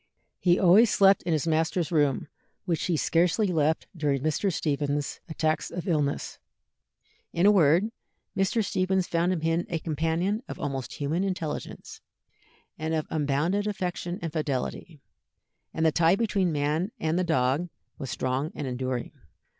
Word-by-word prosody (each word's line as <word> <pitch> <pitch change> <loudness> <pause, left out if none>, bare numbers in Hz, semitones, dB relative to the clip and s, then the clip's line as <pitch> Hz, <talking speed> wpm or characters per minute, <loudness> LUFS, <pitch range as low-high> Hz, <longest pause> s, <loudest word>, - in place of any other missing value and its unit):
He 175 -1 +3
always 200 +5 +6
slept 195 -1 +5
in 175 - -3
his 155 -1 0
master's 160 +1 0
room, 145 -5 +1 0.4
which 170 -4 -1
he 170 -3 +1
scarcely 175 +7 +2
left 160 -4 +1
during 145 -4 0
Mr. 155 +6 +1
Stephens's 145 -2 -1
attacks 155 0 -1
of 180 - -6
illness. 150 -5 -1 0.9
In 170 - +2
a 205 - +8
word, 180 +3 +4 0.4
Mr. 195 +3 +1
Stephens 185 0 +1
found 170 +2 +1
in 180 -4 -1
him 165 +2 0
a 170 - -1
companion 165 +7 -1
of - - -7
almost 135 -3 -4
human 155 +6 -1
intelligence, 180 -6 -5 0.8
and 160 +1 -1
of 155 - -1
unbounded 155 +7 0
affection 180 -3 -3
and 165 - -4
fidelity, 150 +1 -3 0.7
and 160 - -1
the 160 - +5
tie 165 +3 +4
between 200 -4 +1
the 155 -4 -1
man 155 +8 0
and 160 +2 0
the - - +2
dog 155 0 +1 0.3
was 135 -3 -5
strong 130 +4 -2
and 145 - -4
enduring. 130 -1 -3
165 Hz, 155 wpm, -27 LUFS, 150-180 Hz, 0.9 s, a